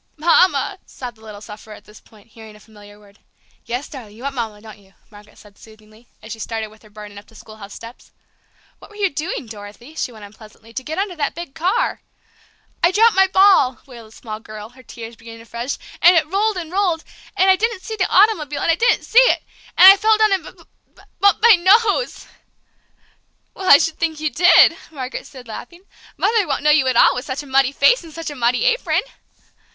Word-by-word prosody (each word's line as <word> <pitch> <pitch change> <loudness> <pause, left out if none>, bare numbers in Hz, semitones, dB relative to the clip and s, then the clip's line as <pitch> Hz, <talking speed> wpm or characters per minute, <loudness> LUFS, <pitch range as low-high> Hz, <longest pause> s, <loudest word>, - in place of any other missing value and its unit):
"Mama!" 345 +3 +2
sobbed 245 -3 -9
the - - -23
little 210 -2 -12
sufferer 215 0 -12
at - - -17
this 210 - -17
point, 215 0 -22
hearing 220 -1 -14
a - - -17
familiar 205 -1 -17
word. 205 -1 -22 0.5
"Yes, 245 +4 -5
darling, 220 -7 -12
you 240 - -13
want 280 0 -4
Mama, 225 -5 -5
don't 215 0 -14
you?" 195 -1 -25 0.2
Margaret 210 0 -17
said 205 -1 -19
soothingly, 215 +1 -19 0.2
as 220 - -11
she 225 - -7
started 220 -1 -5
with 215 0 -21
her 215 - -19
burden 210 -1 -12
up 205 - -20
the 225 - -22
schoolhouse 215 -2 -13
steps. 230 +2 -13 0.7
"What - - -16
were 420 - -18
you 395 -3 0
doing, 300 -1 -5
Dorothy," 215 +5 -12
she 275 - -4
went 215 -3 -12
on 200 - -15
pleasantly, 220 +1 -17
"to 260 - -4
get 315 +5 -6
under 390 -2 -3
that 285 -2 -2
big 340 -5 -8
car?" 380 +10 -1 0.8
"I 345 - +4
dropped 440 +4 +3
my 385 0 +4
ball!" 375 -10 +3
wailed 235 -4 -13
the 220 - -19
small 215 -2 -8
girl, 215 -1 -11
her 255 +2 -18
tears 230 -1 -11
beginning 230 0 -13
afresh, 235 +3 -6 0.2
"and 350 0 +6
it 320 - +2
rolled 400 +5 -1
and 335 -2 -7
rolled. 365 -4 -1 0.3
And 380 +1 +4
I - - +5
didn't 445 -1 -3
see 445 - -6
the 370 -3 0
automobile, 325 -9 +2
and - - +2
I - - +2
didn't 465 +7 +1
see 470 - +4
it! - - +3 0.3
And - - +7
I - - -4
fell 435 +2 +2
down 435 -1 +2
and 380 -3 -1
b - - -10 0.4
b - - -20 0.2
bumped 400 +1 +2
my 465 -1 +8
nose!" 415 +6 +2 1.3
"Well, 375 - -4
I 280 - +10
should 320 +2 -2
think 320 -2 -2
you 310 -1 -2
did!" 350 0 +5
Margaret 265 -4 -7
said, 255 -4 -14
laughing. 345 - -10 0.3
"Mother 440 -5 +1
won't 280 -1 -3
know 300 - +4
you 290 -3 +3
at 260 - +1
all - - +5
with 250 - -6
such 270 +1 -5
a - - -14
muddy 270 -1 +2
face 315 - +2
and 325 - -13
such 325 -1 -7
a - - -9
muddy 245 -1 0
apron!" - - 0
270 Hz, 220 wpm, -19 LUFS, 220-365 Hz, 1.3 s, I